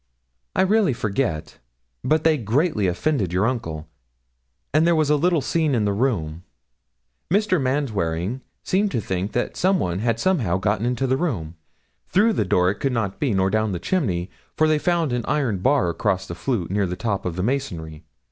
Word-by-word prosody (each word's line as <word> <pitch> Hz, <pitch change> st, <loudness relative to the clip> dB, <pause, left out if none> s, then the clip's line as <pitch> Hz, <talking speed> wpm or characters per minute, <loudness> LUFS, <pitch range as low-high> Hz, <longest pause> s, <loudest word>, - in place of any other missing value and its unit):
'I -, -, +4 dB
really 200 Hz, -5 st, +3 dB
forget; 105 Hz, -, -2 dB, 0.4 s
but 155 Hz, 0 st, +2 dB
they 160 Hz, -1 st, +4 dB
greatly 120 Hz, -, +1 dB
offended 95 Hz, -, 0 dB
your 95 Hz, +3 st, +1 dB
uncle, 80 Hz, -11 st, -3 dB, 0.9 s
and 155 Hz, +2 st, +4 dB
there 170 Hz, -, +4 dB
was 155 Hz, -2 st, +2 dB
a -, -, +5 dB
little 170 Hz, +1 st, +2 dB
scene 155 Hz, -1 st, +1 dB
in 110 Hz, -3 st, +1 dB
the 100 Hz, -, +1 dB
room. 95 Hz, -9 st, -1 dB, 0.9 s
Mr. 190 Hz, -2 st, +2 dB
Manwaring 115 Hz, -, -1 dB, 0.2 s
seemed 200 Hz, +3 st, +1 dB
to -, -, +1 dB
think 95 Hz, -1 st, -3 dB
that 120 Hz, -, -1 dB
some 190 Hz, +1 st, +2 dB
one 90 Hz, +1 st, -1 dB
had 115 Hz, +1 st, 0 dB
somehow 125 Hz, -, +1 dB
got 105 Hz, +2 st, 0 dB
into 125 Hz, +2 st, 0 dB
the 130 Hz, 0 st, +1 dB
room. 105 Hz, -, -2 dB, 0.5 s
Through 215 Hz, +4 st, +3 dB
the 105 Hz, -, 0 dB
door 90 Hz, 0 st, +3 dB
it 105 Hz, -, -8 dB
could 135 Hz, -2 st, 0 dB
not 105 Hz, -5 st, -2 dB
be, 130 Hz, -8 st, +1 dB
nor 95 Hz, 0 st, +2 dB
down 110 Hz, -2 st, +1 dB
the -, -, -1 dB
chimney, 95 Hz, -, -1 dB, 0.3 s
for 155 Hz, -, +4 dB
they 155 Hz, -1 st, +2 dB
found 170 Hz, -5 st, +1 dB
an 120 Hz, -1 st, -1 dB
iron 130 Hz, -10 st, 0 dB
bar 130 Hz, 0 st, +2 dB
across 95 Hz, +2 st, -1 dB
the -, -, -6 dB
flue, 110 Hz, 0 st, -2 dB
near 100 Hz, -1 st, +1 dB
the 90 Hz, -, -3 dB
top 100 Hz, -1 st, -2 dB
in 90 Hz, -, -2 dB
the 90 Hz, +2 st, -3 dB
masonry. 85 Hz, -, -3 dB
115 Hz, 190 wpm, -23 LUFS, 95-150 Hz, 0.9 s, a